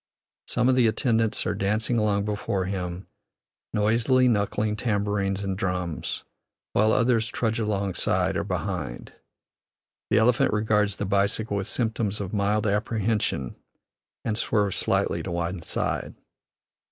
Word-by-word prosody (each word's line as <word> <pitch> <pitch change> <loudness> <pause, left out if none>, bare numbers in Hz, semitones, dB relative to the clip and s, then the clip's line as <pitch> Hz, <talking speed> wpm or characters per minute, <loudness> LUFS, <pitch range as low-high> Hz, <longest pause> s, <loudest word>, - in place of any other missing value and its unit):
Some 125 0 +1
of 130 - +4
the 125 -2 +5
attendants 115 -1 +1
are 110 - 0
dancing 110 +4 0
along 100 -2 +1
before 100 -2 -1
him, 90 -1 -4 0.7
noisily 115 +5 +3
knuckling 105 -1 +1
tambourines 100 -3 -1
and 95 -1 -2
drums, 90 -3 -3 0.5
while 110 +2 +4
others 115 -1 +3
trudge 115 0 -1
alongside 100 -4 0
or - - 0
behind. - - -4 1.0
The - - +3
elephant 115 0 +3
regards 105 -1 +2
the 105 - -3
bicycle 100 +2 +1
with 100 - -2
symptoms 110 -3 -1
of 100 -1 -5
mild 105 +1 +1
apprehension, 105 - 0 0.7
and 110 - 0
swerves 105 -3 +1
slightly - - +1
to - - -5
one 85 +1 -2
side. - - -2
105 Hz, 130 wpm, -26 LUFS, 100-110 Hz, 1.0 s, the